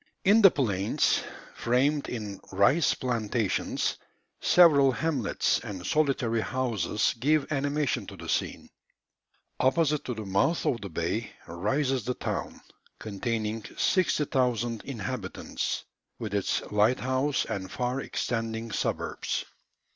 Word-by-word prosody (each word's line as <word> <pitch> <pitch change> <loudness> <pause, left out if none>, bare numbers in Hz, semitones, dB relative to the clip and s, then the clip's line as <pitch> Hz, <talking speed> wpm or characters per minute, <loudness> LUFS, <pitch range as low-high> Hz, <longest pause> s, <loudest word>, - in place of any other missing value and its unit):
In 210 +4 +6
the 195 - +10
plains, 105 - +1 0.3
framed 140 +5 +1
in 105 -5 -5
rice 100 - +3
plantations, 115 -4 -1 0.4
several 145 -6 +6
hamlets 140 -7 0
and 100 -6 -7
solitary 135 -7 +1
houses 110 -6 0
give 150 +3 +2
animation 145 0 0
to - - -9
the - - -9
scene. - - -2 0.9
Opposite 150 +2 +2
to 125 - -3
the 110 -1 -6
mouth 100 - +1
of 120 - 0
the 100 - -6
bay 85 +7 -2 0.2
rises 130 - 0
the 125 +3 -2
town, - - -4 0.4
containing 110 +1 -3
60,000 125 - +1
inhabitants, 120 -5 -4 0.3
with 105 -3 -5
its 100 -2 0
lighthouse 130 +6 +2
and 95 -1 -4
far 125 +2 -1
extending 115 -2 -3
suburbs. - - -2
120 Hz, 110 wpm, -28 LUFS, 105-140 Hz, 0.9 s, the